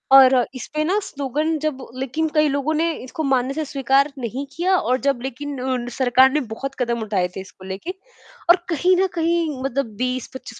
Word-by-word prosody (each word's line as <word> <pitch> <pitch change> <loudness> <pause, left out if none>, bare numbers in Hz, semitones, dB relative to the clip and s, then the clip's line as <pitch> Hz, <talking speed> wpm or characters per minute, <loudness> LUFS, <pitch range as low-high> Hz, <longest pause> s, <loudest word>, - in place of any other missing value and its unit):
और 265 -1 +9 0.2
इसपे 305 +4 -3
ना 390 +6 +2
स्लोगन 295 +3 -1
जब 270 -4 -2
लेकिन 270 +5 -1
कई 305 0 +5
लोगों 285 +2 0
ने 330 +2 +2
इसको 285 +5 -5
मानने 265 -1 +1
से 310 +1 -2
स्वीकार 275 +1 +2
नहीं 250 +3 -4
किया 365 +3 +2
और 255 -5 +1
जब 275 -4 +1
लेकिन 270 +2 -5
उन 255 -2 -1
सरकार 260 +1 +5
ने 300 - +2 0.2
बहुत 275 +2 -5
कदम 235 -2 0
उठाए 200 -4 0
थे - - -4
इसको 190 0 -13
लेके 195 - -5 0.6
और 345 - +8
कहीं 355 +3 +3
न 380 +1 +3
कहीं 330 -4 0
मतलब 270 -4 -2
20-25 255 -1 -4
270 Hz, 185 wpm, -22 LUFS, 255-310 Hz, 0.6 s, और